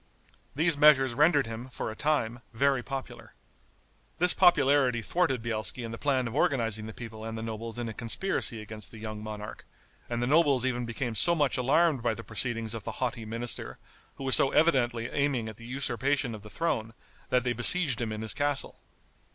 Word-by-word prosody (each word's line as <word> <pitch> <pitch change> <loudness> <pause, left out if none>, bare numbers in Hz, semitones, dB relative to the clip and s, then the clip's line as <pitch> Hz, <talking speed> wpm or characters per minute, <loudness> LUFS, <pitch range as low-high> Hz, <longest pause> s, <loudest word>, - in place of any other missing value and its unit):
These 160 0 +2
measures 135 -4 +6
rendered 145 +1 +4
him, 115 +3 -7
for 120 - -4
a - - -9
time, 120 -5 0
very 135 +2 +2
popular. 135 +1 -7 0.8
This 180 +1 +6
popularity 140 -8 +4
thwarted 135 -5 0
Bielski 110 0 -1
in 115 - -5
the 115 - -7
plan 135 -4 +1
of 115 - -6
organizing 115 -6 0
the - - -6
people 110 -1 -9
and 115 0 -5
the 110 - -5
nobles 115 +1 -6
in 120 -1 -3
a 110 - -5
conspiracy 115 - -1
against 105 -1 -7
the 115 - -12
young 110 -1 -6
monarch, 105 -1 -7 0.5
and 120 -1 -2
the 120 - 0
nobles 140 -3 +3
even 125 -2 -1
became 115 +1 -3
so 170 +10 +3
much 145 -5 +1
alarmed 145 +2 +2
by 115 -1 0
the 115 - -8
proceedings 115 0 -2
of 115 -3 -6
the - - -5
haughty 120 -3 -3
minister, 115 +2 -3 0.4
who - - -8
was 130 -1 +4
so 135 - +3
evidently 125 -8 +2
aiming 140 -5 -1
at 110 -2 -8
the 115 - -11
usurpation 135 0 0
of 110 - -8
the 105 - -12
throne, 115 -7 -2 0.3
that 125 -1 +2
they 125 -1 0
besieged 130 +2 +2
him 115 -2 -2
in 110 0 -5
his 110 - +1
castle. 145 -1 0
120 Hz, 195 wpm, -28 LUFS, 115-140 Hz, 0.8 s, measures